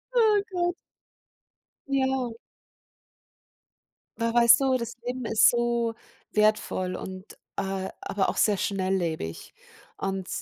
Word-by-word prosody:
Oh 430 -3 +5
Gott. 350 -1 0 1.1
Ja. 265 -3 0 1.9
Aber 230 0 0
weißt 235 +1 +7
du, 265 -1 +3
das 235 -1 -4
Leben 250 0 -3
ist 220 0 +5
so 235 -1 0 0.4
wertvoll 210 -4 +1
und, 185 +1 -9 0.2
äh, 190 0 -2
aber 195 -1 -1
auch - - -1
sehr 210 -2 +3
schnelllebig. 185 - -2 0.4
Und, 195 -1 -3
230 Hz, 105 wpm, -27 LUFS, 190-255 Hz, 1.9 s, weißt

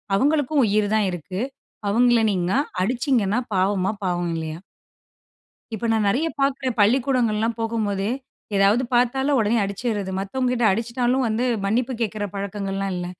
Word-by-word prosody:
அவங்களுக்கும் 290 +3 +2
உயிர் 205 0 +2
தான் 210 -3 +2
இருக்கு. 185 +4 -5 0.5
அவங்கள 240 +1 +4
நீங்கனா 185 +7 +1 0.2
அடிச்சிங்கன்னா 240 -1 +1 0.2
பாவமா, 190 +1 +1
பாவம் 175 -2 -1
இல்லயா?" 160 0 -5 1.2
இப்ப 220 +2 -3
நான் 215 -2 +1
நெறைய 275 +11 +1
பார்க்கிறேன். 275 -3 0
பள்ளிக்கூடங்கள்லாம் 230 -1 +2
போகும்போதே, 215 -2 -1 0.5
ஏதாது 200 +5 +4
பார்த்தாலும் 265 +3 +2
உடனே 220 +2 +2
அடிச்சிறது. 200 -1 -3
மத்தவங்க 250 +6 -1
கிட்ட 245 -1 0
அடிச்சிட்டாலும் 240 +4 0
வந்து 220 +3 0 0.2
மன்னிப்பு 240 +6 0
கேட்கிற 215 -1 -2
பழக்கங்கள்லாம் 195 -1 -3
இல்ல. 175 0 -3
220 Hz, 125 wpm, -23 LUFS, 195-250 Hz, 1.2 s, அவங்கள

